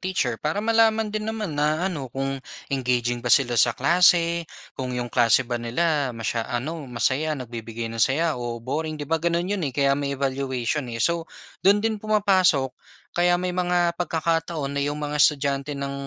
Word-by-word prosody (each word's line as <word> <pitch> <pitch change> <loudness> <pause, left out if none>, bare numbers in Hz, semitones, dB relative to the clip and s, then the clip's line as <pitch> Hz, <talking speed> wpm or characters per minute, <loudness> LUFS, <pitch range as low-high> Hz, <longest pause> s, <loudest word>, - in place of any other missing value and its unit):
teacher 175 -11 -1
para 160 +8 -2
malaman 225 -1 +3
din 215 0 -3
naman 215 -6 -3
na 155 +5 0
ano 140 -6 -5
kung 135 +1 -3 0.3
engaging 120 -2 0
ba 125 - -3
sila 120 +1 +4
sa 120 - +3
klase? 170 -1 +3 0.2
Kung 125 -2 -4
'yong 120 -1 -4
klase 120 +1 +4
ba 120 -1 -3
nila 145 +4 0
masya 115 0 -2
ano 140 +4 -4
masaya 135 +6 0
nagbibigay 115 -2 -6
ng 115 - -4
saya 155 +7 +2
o 120 -1 -5
boring, 155 +4 -3
'di 150 - -5
ba, 160 +2 -1
gano'n 170 +3 0
'yon, 205 - -1
eh, - - -7
kaya 140 -1 +3
may 140 0 -2
evaluation, 135 0 -2
eh. 115 - -5
So 170 -1 0 0.3
do'n 205 +3 +4
din 220 -2 0
pumapasok 190 -11 +3 0.4
kaya 175 0 +3
may 180 0 -2
mga 175 -1 +1
pagkakataon 165 -3 -1
na 140 - -1
'yong 145 +1 -1
mga 150 0 -2
estudyante 140 -1 +2
ng 140 0 -4
145 Hz, 180 wpm, -24 LUFS, 130-175 Hz, 0.4 s, sila